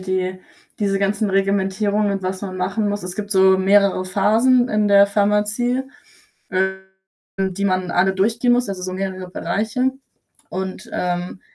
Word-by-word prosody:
die 185 0 -2 0.4
diese 195 -2 0
ganzen 200 +1 0
Reglementierungen 200 +1 +1
und 195 -1 -3
was 185 +1 -4
man 185 -2 -5
machen 205 +3 -1
muss 205 0 -3
es 180 +1 -6
gibt 210 -1 -5
so 190 -1 +5
mehrere 195 0 +3
Phasen 225 +7 +3
in 215 -2 +1
der 200 0 +6
Pharmazie, 210 +5 0 0.7
ähm, 190 0 -1 0.7
die 200 - -1
man 185 -2 0
alle 190 +2 +2
durchgehen 230 +5 +2
muss, 245 -3 0
also 185 -2 -5
so 185 0 -4
mehrere 185 -1 -4
Bereiche 220 +7 -1 0.6
und, 190 0 -5
ähm 180 +1 -3
195 Hz, 150 wpm, -20 LUFS, 185-210 Hz, 0.7 s, der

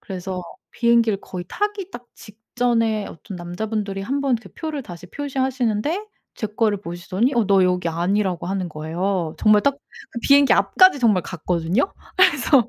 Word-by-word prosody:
그래서 185 -1 -5 0.3
비행기를 235 -3 +2
거의 180 -2 -7
타기 415 -2 -3
딱 240 0 -10
직전에 225 0 -1
어떤 180 +4 -9
남자분들이 195 +3 -4
1 275 +7 -2
번 270 -3 +2
그 220 -4 -14
표를 310 -3 -5
다시 180 -5 -10
표시하시는데 265 - -1 0.3
제 215 - -3
거를 210 -1 0
보시더니 185 +8 -1
어 235 -2 +3
너 195 -1 +4
여기 180 -1 +1
아니라고 180 +2 -1
하는 190 -1 -2
거예요. 165 +2 -2
정말 210 -1 +5
딱 280 -1 +2 0.3
그 235 - -5
비행기 280 +2 +5
앞까지 370 -6 +5
정말 215 -7 +3
갔거든요. 180 - -1 0.2
그래서 280 - +4
215 Hz, 345 characters per minute, -22 LUFS, 185-255 Hz, 0.3 s, 정말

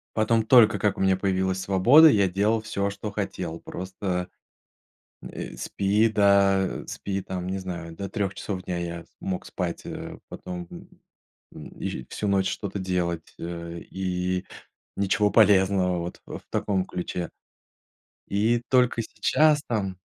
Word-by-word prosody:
Потом, 110 +1 +2
только 120 -2 +6
как 105 - +1
у - - -3
меня 95 0 +4
появилась 95 -1 0
свобода, 120 - +7
я 100 -8 +4
делал 105 +5 +1
всё, 100 -2 -2
что 100 +1 -6
хотел. 90 -5 -4
Просто, 90 0 -4 0.9
м, - - -8
э, - - -7
спи 105 +3 +1
до, 100 -2 +3
спи, 100 -1 -4
там, 90 -1 -5
не 95 +1 -2
знаю, 85 -3 -6
до 100 +3 -5
3 100 -3 -2
часов 95 -1 -4
дня 90 -1 -3
я 85 -1 -5
с - - -35
мог 95 -2 -3
спать, 90 -2 -4
э, - - -7
потом, 90 -1 -7
м - - -11 0.7
м, 75 - -9
и - - -4
всю 105 - -3
ночь 95 -1 +2
что-то 100 -1 -4
делать, 90 -3 -2
э, 85 0 -6
и 90 0 -2 0.6
ничего 105 +1 +2
полезного, 95 -3 +4
вот 85 +1 -6
ф - - -7
в - - -53
таком 95 -3 0
ключе. 90 -1 -4 1.0
И 110 +4 +1
только 125 -2 +3
сейчас 150 +6 +2
там 100 -5 -2
95 Hz, 150 wpm, -26 LUFS, 90-105 Hz, 1.0 s, свобода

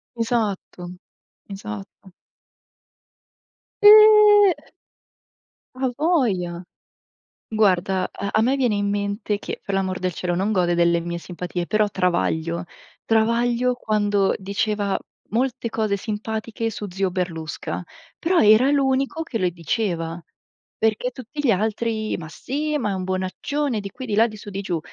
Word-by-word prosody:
Esatto. 220 -6 -2 0.6
Esatto. 185 - -9 1.7
Eh! 420 -2 +8 1.2
Avoja! 245 - 0 0.8
Guarda, 190 -3 +1
ehm, 200 - -4
a 215 - +3
me 260 +5 +2
viene 245 -6 +1
in 205 0 0
mente 205 +1 -2
che - - -6
per 200 - -4
l'amor 190 -1 -1
del 185 -1 -1
cielo 175 +2 -2
non 195 +4 0
gode 175 -4 +2
delle 170 0 +3
mie 170 0 -4
simpatie, 175 0 -5
però 215 +2 +2
Travaglio, 170 -2 -1 0.4
Travaglio 235 +2 +2
quando 205 -4 +1
diceva 200 +1 -1 0.3
molte 245 +1 -1
cose 215 -2 0
simpatiche 220 +2 -4
su 210 -1 -6
zio 190 +1 0
Berlusca, 175 -4 -4 0.4
però 350 +1 +2
era 220 +5 +6
l'unico 275 +2 +1
che 265 -7 -4
le 185 -4 +1
diceva, 170 -1 -2 0.6
perché 225 +3 0
tutti 255 +4 -10
gli 270 -5 +3
altri: 220 +2 -1
"Ma 160 - -8
sì, 300 - -3
ma 225 -7 -1
è - - -1
un 185 - -4
bonaccione" 190 +8 -2
di 200 -1 -6
qui, 260 - -8
di 215 -4 -2
là, 225 +2 +5
di 215 - -9
su 205 - -10
di 195 0 -4
giù. 175 -4 -2
210 Hz, 135 wpm, -22 LUFS, 185-240 Hz, 1.7 s, Eh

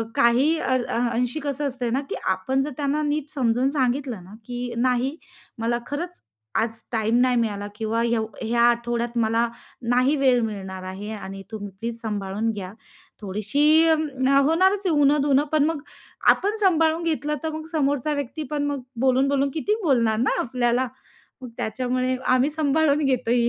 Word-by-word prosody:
काही 250 +7 +4
अ, 260 - 0 0.2
अ, - - -1
अंशी 245 +5 -1
कसं 285 -1 -2
असतंय 250 -3 -3
ना, 260 +4 0
की - - -2
आपण 190 +9 0
जर 295 - -4
त्यांना 290 +1 0
नीट 295 0 -1
समजून 250 -1 +1
सांगितलं 255 - -1
ना, 185 +3 -14
की 245 0 -4
"नाही, 255 +4 +1 0.4
मला 235 +1 0
खरंच 345 +5 -5 0.4
आज 225 0 -2
टाईम 225 0 +1
नाही 250 0 +3
मिळाला 205 -3 -1
किंवा 225 +1 -1
येव 235 -2 +1 0.2
ह्या 235 +1 +1
आठवड्यात 235 0 -1
मला 230 +1 +2 0.5
नाही 255 +4 +3
वेळ 260 -3 +4
मिळणार 190 -3 -5
आहे 190 +3 -6
आणि 195 -1 -8
तुम्ही 205 -2 -5
प्लीज 230 +1 -4
सांभाळून 210 0 -2
घ्या." 195 -2 -6 0.5
थोडीशी 210 +7 -1 0.3
होणारच 315 +6 +2
आहे - - +2
उण-दुणं, 285 0 +4
पण 305 -2 +4
मग 320 -2 -1 0.5
आपण 410 +2 0
सांभाळून 325 -3 +3
घेतलं, 300 -2 -1
तर 320 - -1
मग 315 0 -5
समोरचा 285 -1 +1
व्यक्ती 285 +2 -4
पण 295 -1 0
मग 285 -2 -2 0.2
बोलून-बोलून 270 +2 +2
किती 405 +7 +1
बोलणार 235 -8 +2
ना, 245 +4 +1
आपल्याला? 245 +1 0 0.6
मग 250 - -7
त्याच्यामुळे 255 +3 -1
आम्ही 255 +3 +3
सांभाळून 300 0 +2
घेतो 250 -3 0
ही 235 0 +3
255 Hz, 160 wpm, -24 LUFS, 230-290 Hz, 0.6 s, काही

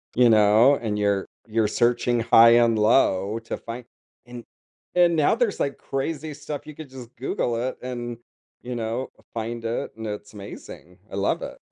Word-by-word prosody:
You 125 -1 +5
know? 110 +5 +6
And 110 -5 -3
you're 100 -1 +1 0.2
you're 110 -1 +1
searching 120 +1 +1
high 115 0 +7
and 115 -1 +4
low 105 -2 +3
to 115 - -6
find 115 +1 -8 0.4
and 120 -1 -9 0.5
and 175 -1 +5
now 155 +5 +3
there's, 230 -3 0
like, 140 - -1
crazy 150 +3 -4
stuff, 145 0 -7
you 155 - -9
could 155 -2 -10
just 125 -2 -11
Google 120 -1 -1
it 125 +3 -3
and, 120 -1 -5 0.5
you 125 0 -5
know, 115 +3 -3 0.2
find 115 +1 -4
it, 115 +1 -2
and 110 0 -5
it's 105 0 -6
amazing. 100 -3 -11
I - - -6
love 100 - 0
it. - - -7
120 Hz, 175 wpm, -24 LUFS, 110-130 Hz, 0.5 s, high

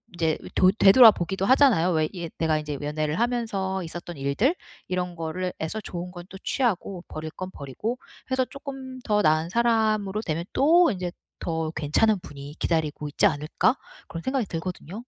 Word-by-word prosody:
이제 160 -2 +1
이 - - -10
돌 185 +1 +5
되돌아보기도 195 -3 +6
하잖아요 245 - +5
왜 155 -2 +1
예 170 -2 -5
내가 160 -1 +2
이제 150 -2 -5
연애를 150 +3 -2
하면서 205 -6 -1
있었던 175 +1 -7
일들. 140 - +1 0.3
이런 180 -1 -2
거를 165 +3 -3
해서 160 +7 -3
좋은 180 -1 -6
건 175 -1 -9
또 190 - -9
취하고 200 -9 -1
버릴 155 0 -6
건 185 +1 -7
버리고 195 - -4 0.3
해서 260 -1 +2
'쪼끔 270 -2 -8
더 210 -1 +2
나은 155 +2 +2
사람으로 215 -2 +1
되면 165 -3 -2
또 330 +2 +5
인제 180 -3 -3 0.3
더 160 -1 -2
괜찮은 170 +7 +2
분이 140 +1 -10
기다리고 155 -3 -1
있지 180 - +2
않을까?' 155 - +1 0.3
그런 165 - -6
생각이 260 -4 0
들거든요. 175 +1 -5
180 Hz, 360 characters per minute, -25 LUFS, 160-220 Hz, 0.3 s, 되돌아보기도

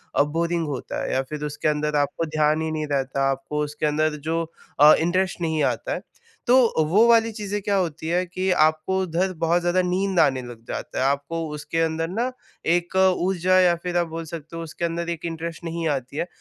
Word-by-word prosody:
अ, - - +5
boring 165 +2 -1
होता 140 -3 -4
है - - -2
या 130 - +2
फिर 150 -1 -5
उसके 150 +1 -3
अंदर 150 0 0
आपको 145 +3 0
ध्यान 155 0 +1
ही 160 0 -2
नहीं 155 -1 -2
रहता, 135 0 0
आपको 135 +3 -3
उसके 150 +1 -3
अंदर 150 +1 +1
जो 165 0 +1 0.4
अ, 150 +1 +9
इंटरेस्ट 180 +2 0
नहीं 160 -2 0
आता - - -1
है। - - -4 0.5
तो 250 - +6 0.3
वो 210 +7 +5
वाली 230 -1 +5
चीज़ें 205 -1 -4
क्या 200 0 0
होती 160 -4 -2
है 180 +2 +1
कि 185 +2 -2 0.2
आप 155 0 +1
उधर 185 0 0
बहुत 165 +2 +2
ज़्यादा 175 +1 +2
नींद 185 0 0
आने 130 -1 +3
लग 120 -2 -10
जाता - - -5
है, 130 - +2
आपको 140 +4 -1
उसके 165 +2 -3
अंदर 165 0 0
ना 235 +7 -1 0.4
एक 175 +1 -3
ऊर्जा 185 0 +3
या 180 -2 +5
फिर 175 -1 -1
आप 170 -1 +1
बोल 165 0 -6
सकते 165 0 -8
हो - - -4
उसके 165 +1 -4
अंदर 170 0 -3
एक 170 -1 -4
इंटरेस्ट 165 0 -5
नहीं 165 0 -2
आती 130 +2 -7
है। 170 - -1
165 Hz, 210 wpm, -24 LUFS, 150-180 Hz, 0.5 s, अ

